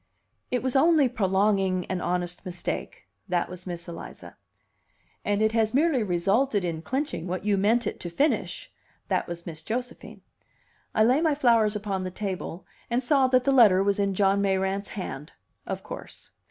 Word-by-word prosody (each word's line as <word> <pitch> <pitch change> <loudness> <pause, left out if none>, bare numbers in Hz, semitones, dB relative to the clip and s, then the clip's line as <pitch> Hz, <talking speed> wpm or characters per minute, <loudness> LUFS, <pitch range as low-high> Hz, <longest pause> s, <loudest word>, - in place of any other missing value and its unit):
"It 250 -1 -1
was 260 0 -1
only 300 0 +5
prolonging 195 -4 +1
an 185 -1 -3
honest 175 0 -1
mistake." 180 -1 -5 0.2
That 175 -1 0
was 180 0 -10
Miss 175 -1 -6
Eliza. 170 -1 -9 0.9
"And 205 +1 +1
it 220 - +3
has 225 0 +1
merely 295 -3 +3
resulted 200 +4 +1
in 165 -2 -3
clinching 260 - -3
what 185 +2 -4
you 205 -1 +3
meant 215 +5 +2
it - - -3
to 175 - -5
finish." 300 - -1 0.4
That - - 0
was 170 0 -7
Miss 160 -2 -6
Josephine. 245 +8 -5 0.7
I 215 - +5
laid 255 +7 +4
my 315 -3 +2
flowers 230 -6 +3
upon 200 -2 -2
the 185 - -3
table, 185 -2 -5 0.2
and 245 +2 0
saw 270 0 +4
that 255 -1 +3
the 275 - +2
letter 210 -8 +6
was 200 0 +1
in 200 -1 +1
John 195 0 +3
Mayrant's 195 0 0
hand. 150 -7 -6 0.3
Of - - -4
course. - - -10
200 Hz, 170 wpm, -26 LUFS, 185-245 Hz, 0.9 s, letter